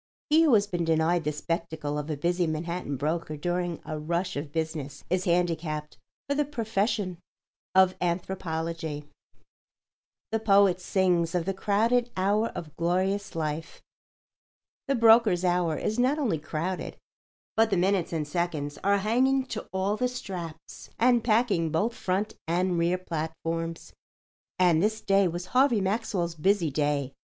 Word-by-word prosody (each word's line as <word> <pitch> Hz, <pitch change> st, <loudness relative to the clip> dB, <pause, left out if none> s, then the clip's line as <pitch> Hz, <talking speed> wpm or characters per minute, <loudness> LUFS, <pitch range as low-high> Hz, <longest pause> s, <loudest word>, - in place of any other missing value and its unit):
He 315 Hz, +2 st, +6 dB
who 300 Hz, -7 st, +5 dB
has 205 Hz, -1 st, +4 dB
been 175 Hz, -4 st, -2 dB
denied 165 Hz, +1 st, +2 dB
the 150 Hz, -, +1 dB
spectacle 155 Hz, -1 st, -3 dB
of 150 Hz, +1 st, -6 dB
a 150 Hz, -, -2 dB
busy 175 Hz, +3 st, +1 dB
Manhattan 160 Hz, -2 st, -3 dB
broker 155 Hz, +2 st, -2 dB
during 175 Hz, +1 st, -2 dB
a 155 Hz, -1 st, -4 dB
rush 170 Hz, +4 st, -2 dB
of 145 Hz, 0 st, -5 dB
business 160 Hz, -3 st, -4 dB
is 185 Hz, 0 st, +1 dB
handicapped 165 Hz, -3 st, -1 dB, 0.3 s
for 280 Hz, -, +1 dB
the 295 Hz, +1 st, +2 dB
profession 220 Hz, -, -1 dB, 0.6 s
of 190 Hz, -1 st, +6 dB
anthropology. 165 Hz, -3 st, -3 dB, 1.3 s
The 225 Hz, -, +1 dB
poet 200 Hz, -4 st, +4 dB
sings 180 Hz, -2 st, +1 dB
of 170 Hz, -2 st, 0 dB
the 195 Hz, -, -1 dB
"crowded 230 Hz, +5 st, +1 dB
hour 205 Hz, +4 st, +2 dB
of 155 Hz, -3 st, -7 dB
glorious 185 Hz, +4 st, 0 dB
life." 155 Hz, 0 st, -4 dB, 1.0 s
The 275 Hz, -, +2 dB
broker's 225 Hz, -6 st, +5 dB
hour 175 Hz, -3 st, +1 dB
is 215 Hz, +3 st, -2 dB
not 260 Hz, +4 st, +3 dB
only 230 Hz, -, 0 dB
crowded, 170 Hz, +5 st, -4 dB, 0.6 s
but 225 Hz, 0 st, +4 dB
the 195 Hz, -, +1 dB
minutes 185 Hz, 0 st, +1 dB
and 155 Hz, -3 st, -2 dB
seconds 150 Hz, -3 st, -2 dB
are 200 Hz, +1 st, +3 dB
hanging 255 Hz, +6 st, +2 dB
to -, -, -5 dB
all 190 Hz, +2 st, 0 dB
the 250 Hz, -, +1 dB
straps 185 Hz, -10 st, -7 dB
and 240 Hz, -1 st, +4 dB
packing 215 Hz, -8 st, +2 dB
both 200 Hz, +10 st, 0 dB
front 200 Hz, +1 st, -2 dB
and 175 Hz, +1 st, +1 dB
rear 170 Hz, +2 st, +2 dB
platforms. 165 Hz, -1 st, -4 dB, 0.6 s
And 175 Hz, -3 st, +4 dB
this 215 Hz, +2 st, +1 dB
day 195 Hz, -1 st, +3 dB
was 175 Hz, +1 st, -4 dB
Harvey 255 Hz, -3 st, +4 dB
Maxwell's 190 Hz, -3 st, -1 dB
busy 170 Hz, 0 st, +1 dB
day. 145 Hz, -2 st, 0 dB
180 Hz, 150 wpm, -27 LUFS, 160-205 Hz, 1.3 s, He